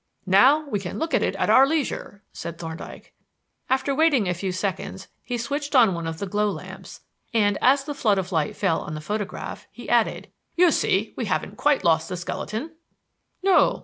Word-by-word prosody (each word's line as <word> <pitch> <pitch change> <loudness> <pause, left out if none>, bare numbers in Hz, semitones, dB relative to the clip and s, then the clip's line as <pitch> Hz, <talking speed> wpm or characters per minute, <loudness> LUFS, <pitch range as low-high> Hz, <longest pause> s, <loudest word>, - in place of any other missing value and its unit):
"Now 260 +11 +5
we 210 -7 -1
can 180 -2 -6
look 320 0 -3
at - - +3
it - - 0
at - - +1
our 270 +1 +7
leisure," 280 -9 -3
said 170 -1 -7
Thorndyke. 165 -1 -9 0.6
After 265 +1 +1
waiting 275 - +3
a 180 - +1
few 185 +2 -3
seconds, 190 0 -4
he 245 - -4
switched 285 +5 -3
on 230 -7 +6
one 170 -1 -4
of 165 0 -4
the 200 - -4
glow 210 +2 0
lamps, - - -9 0.3
and 205 -2 +3
as 275 +2 +4
the 290 +1 -5
flood 215 -8 +1
of 190 0 -3
light 160 -4 0
fell 165 - 0
on 155 - -6
the - - -5
photograph, 205 +5 -5
he - - -11
added: - - +1 0.2
"You 355 -1 +5
see - - +1
we - - -3
haven't - - -2
quite 290 -1 +2
lost 160 -1 +2
the 180 - -4
skeleton." 220 - -5 0.7
"No." 385 -1 +4
210 Hz, 195 wpm, -24 LUFS, 180-280 Hz, 0.7 s, our